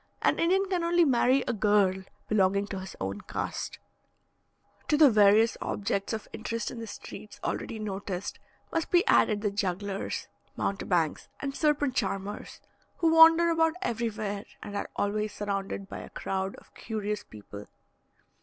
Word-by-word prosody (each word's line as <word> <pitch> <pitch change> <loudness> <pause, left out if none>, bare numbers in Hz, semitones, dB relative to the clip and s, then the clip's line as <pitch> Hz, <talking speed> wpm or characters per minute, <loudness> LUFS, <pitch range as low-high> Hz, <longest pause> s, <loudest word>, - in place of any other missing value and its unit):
An - - +3
Indian 375 +4 +3
can 365 -3 -1
only 340 0 +4
marry 260 0 +3
a - - +1
girl 205 -3 +3 0.3
belonging 200 -1 +2
to 200 -1 -5
his 190 0 -8
own - - -3
caste. - - -4 1.1
To 300 - +3
the 295 -4 +7
various 210 +1 +5
objects 200 -1 -2
of 220 -2 -4
interest 230 +1 -3
in 240 - -7
the 225 - -6
streets 210 - -10
already 225 - -3
noticed, 200 -3 -4 0.3
must 330 - -1
be 355 +3 +4
added 215 - +4
the 210 -2 0
jugglers, 200 0 -2 0.3
mountebanks, 175 -5 0
and 275 -1 -4
serpent 290 -3 +2
charmers, 195 -2 -3 0.4
who 330 -1 +3
wander 325 +1 +8
about 325 0 +2
everywhere, 215 - -2 0.2
and 205 - -7
are 200 - -3
always 210 +1 -1
surrounded 195 -1 -3
by - - -7
a - - -9
crowd 190 0 -3
of - - -18
curious 210 -2 -4
people. 105 -1 -11
210 Hz, 150 wpm, -28 LUFS, 200-275 Hz, 1.1 s, wander